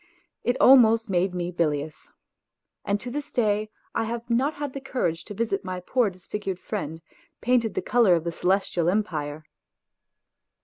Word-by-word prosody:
It 245 +1 +1
almost 230 -5 +6
made 180 0 +1
me 175 0 -2
bilious. 150 -3 -2 0.7
And 200 0 0
to 245 - -6
this 290 +2 -5
day 215 -2 +1 0.2
I - - 0
have 235 +1 -4
not 265 +6 +2
had 285 -2 -4
the 275 - -6
courage 170 -12 -2
to 205 - -8
visit 220 -2 -1
my 185 -1 -4
poor 235 +5 +1
disfigured 190 +1 -5
friend, 165 -7 -5 0.4
painted 235 -2 +1
the - - -1
colour 220 -6 +4
of 165 - -1
the 170 - -2
Celestial 180 -1 +1
Empire. 155 -7 -2
205 Hz, 160 wpm, -25 LUFS, 175-235 Hz, 0.7 s, almost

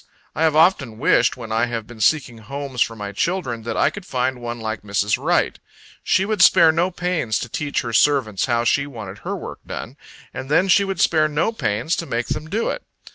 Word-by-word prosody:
I - - -4
have 160 -2 +3
often 155 - +3
wished, - - +3
when 115 -3 -8
I 115 +2 +1
have 115 -2 -4
been 115 -1 -11
seeking 120 -2 +1
homes 135 +2 -5
for 115 - +1
my 105 -2 -6
children, 125 - -2
that 115 - -4
I - - +3
could 205 - -8
find 130 -5 -2
one 120 0 -5
like 110 -1 -4
Mrs. 100 0 -1
Wright. - - +1 0.4
She 190 +2 +2
would 210 -2 -1
spare 165 -3 +7
no 170 +3 +1
pains 180 - -1
to - - -4
teach 150 -1 -2
her 115 -1 -5
servants 115 -5 +2
how 120 -1 +1
she 140 +4 +1
wanted 105 -7 -8
her - - -4
work - - -8
done; - - -7 0.4
and 135 - -6
then 175 +6 +3
she 200 +2 +5
would 195 -2 -3
spare 155 -2 +3
no 150 +8 0
pains 120 - -1
to 170 - -4
make 115 +1 -2
them 155 - -4
do 220 +6 0
it. - - -5
130 Hz, 220 wpm, -21 LUFS, 115-165 Hz, 0.4 s, spare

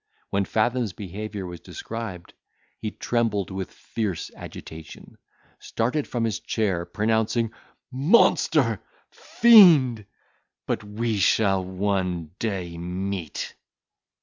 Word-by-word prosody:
When 100 0 +1
Fathom's 115 -1 0
behaviour 105 +1 -6
was 90 -1 -7
described, 110 -5 -7 0.5
he 110 - -3
trembled 110 -4 -1
with 95 -1 -5
fierce 105 -7 -4
agitation, 80 -1 -11 0.4
started 130 +6 -1
from 120 -2 -2
his 110 -3 -1
chair, 95 -6 -1
pronouncing, 110 +1 0 0.4
"Monster! 145 - +3 0.3
fiend! 155 - +6 0.6
but - - -2
we 105 +1 -2
shall 95 +1 +3
one 90 -3 -2
day 90 -6 -3
meet." 90 -1 -4
105 Hz, 95 wpm, -25 LUFS, 95-115 Hz, 0.6 s, fiend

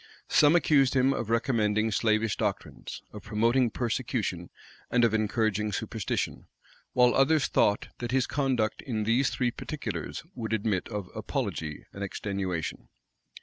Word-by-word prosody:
Some 150 +2 +5
accused 140 -6 +4
him 130 +1 +4
of 115 -4 -3
recommending 110 -2 +1
slavish 110 0 +2
doctrines, - - -4
of 105 - -8
promoting 115 +4 +2
persecution, 115 -7 -2 0.4
and 120 -1 +4
of 115 - +1
encouraging 110 -1 +1
superstition; - - -3 0.5
while 125 -1 +5
others 140 +2 +4
thought 100 0 +2
that 120 - -3
his 130 0 +2
conduct 130 -6 0
in 110 -5 -2
these 115 +5 +2
three 125 -2 0
particulars 110 - -5
would 110 -2 -4
admit 105 -3 0
of 105 -4 -4
apology 75 -2 -3
and 100 - -5
extenuation. 95 -4 -3
115 Hz, 135 wpm, -28 LUFS, 105-125 Hz, 0.5 s, Some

